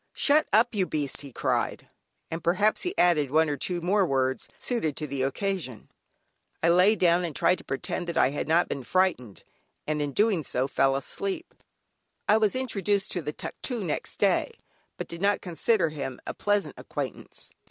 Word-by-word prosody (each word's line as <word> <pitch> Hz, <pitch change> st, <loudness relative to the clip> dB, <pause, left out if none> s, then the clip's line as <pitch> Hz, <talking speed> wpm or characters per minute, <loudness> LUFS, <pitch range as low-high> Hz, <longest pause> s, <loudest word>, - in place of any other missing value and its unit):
"Shut 295 Hz, +2 st, +4 dB
up 230 Hz, +4 st, +4 dB
you 195 Hz, -4 st, +1 dB
beast," 145 Hz, -3 st, -2 dB
he 140 Hz, -2 st, -10 dB
cried, -, -, -1 dB, 0.4 s
and 165 Hz, +1 st, -4 dB
perhaps 195 Hz, +5 st, +2 dB
he 360 Hz, +2 st, -3 dB
added 155 Hz, -6 st, +3 dB
one 155 Hz, +2 st, +3 dB
or -, -, 0 dB
two 175 Hz, +5 st, -3 dB
more 195 Hz, +4 st, +2 dB
words 130 Hz, -5 st, 0 dB
suited 195 Hz, -, -2 dB
to 155 Hz, -, -2 dB
the 140 Hz, -2 st, -3 dB
occasion. 140 Hz, -, -3 dB, 0.7 s
I 170 Hz, -, +5 dB
lay 180 Hz, +5 st, +5 dB
down 175 Hz, -2 st, +3 dB
and 165 Hz, -5 st, -4 dB
tried 180 Hz, -, +2 dB
to -, -, -12 dB
pretend 155 Hz, +6 st, -4 dB
that 170 Hz, -, -3 dB
I 130 Hz, -, +4 dB
had 145 Hz, -, -3 dB
not 165 Hz, +3 st, +3 dB
been 140 Hz, -, -4 dB
frightened, 130 Hz, -, 0 dB, 0.4 s
and 150 Hz, 0 st, -1 dB
in 145 Hz, -1 st, -1 dB
doing 205 Hz, 0 st, +2 dB
so, 130 Hz, 0 st, 0 dB
fell 135 Hz, 0 st, +2 dB
asleep. 195 Hz, -, -4 dB, 0.7 s
I 210 Hz, -, +5 dB
was 215 Hz, +1 st, +2 dB
introduced 205 Hz, -6 st, 0 dB
to 175 Hz, -, -2 dB
the 150 Hz, -1 st, -3 dB
"Tuctoo" 235 Hz, -, -5 dB
next 160 Hz, -5 st, -3 dB
day, -, -, +2 dB, 0.5 s
but -, -, -5 dB
did 170 Hz, +1 st, -8 dB
not 200 Hz, 0 st, +3 dB
consider 180 Hz, +1 st, +1 dB
him 140 Hz, -4 st, -5 dB
a -, -, -4 dB
pleasant 205 Hz, -1 st, 0 dB
acquaintance. -, -, -5 dB
170 Hz, 185 wpm, -27 LUFS, 145-200 Hz, 0.7 s, I